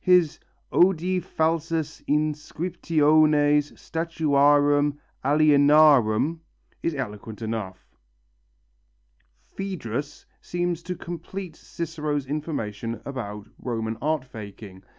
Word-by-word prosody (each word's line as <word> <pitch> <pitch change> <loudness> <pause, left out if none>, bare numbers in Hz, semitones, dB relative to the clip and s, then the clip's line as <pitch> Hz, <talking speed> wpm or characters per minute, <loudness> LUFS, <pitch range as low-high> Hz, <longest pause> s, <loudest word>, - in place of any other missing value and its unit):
His 180 -4 +4 0.3
"Odi 180 0 +3
falsas 165 -2 -1
inscriptiones 150 -1 +2
statuarum 145 -3 +2 0.3
alienarum" 145 -2 +5 0.4
is 165 - -1
eloquent 110 -3 -6
enough. 110 -4 -4 1.7
Phœdrus 145 - -5 0.2
seems 175 -1 -2
to 180 +1 -5
complete 175 +1 -7
Cicero's 150 -5 -4
information 115 -7 -4
about 105 -7 -6
Roman 115 -2 -3
art 155 -3 0
faking. 100 -5 -10
150 Hz, 75 wpm, -25 LUFS, 125-165 Hz, 1.7 s, alienarum